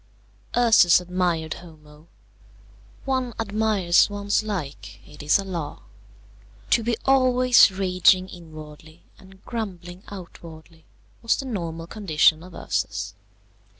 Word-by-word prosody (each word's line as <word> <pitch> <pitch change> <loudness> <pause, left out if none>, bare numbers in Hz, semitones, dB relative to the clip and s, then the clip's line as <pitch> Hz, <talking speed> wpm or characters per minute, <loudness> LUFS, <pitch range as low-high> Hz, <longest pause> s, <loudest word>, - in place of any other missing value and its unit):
Ursus 220 -8 +5
admired 180 -3 -2
Homo. 155 -2 -17 1.0
One 260 -3 -2
admires 210 -5 +2
one's 205 0 -1
like. 140 - -6
It 150 - -13
is 145 +1 +3
a 200 - -4
law. 170 -6 -6 0.9
To - - +4
be 230 0 -1
always 255 -3 +5
raging 185 -1 +2
inwardly 155 -2 -13 0.2
and 190 -1 -19
grumbling 185 -6 -6
outwardly 165 -4 -12 0.4
was 230 - +2
the 270 - -6
normal 170 -9 -5
condition 165 -5 +2
of 180 +1 -13
Ursus. - - -3
180 Hz, 110 wpm, -23 LUFS, 160-215 Hz, 1.0 s, Ursus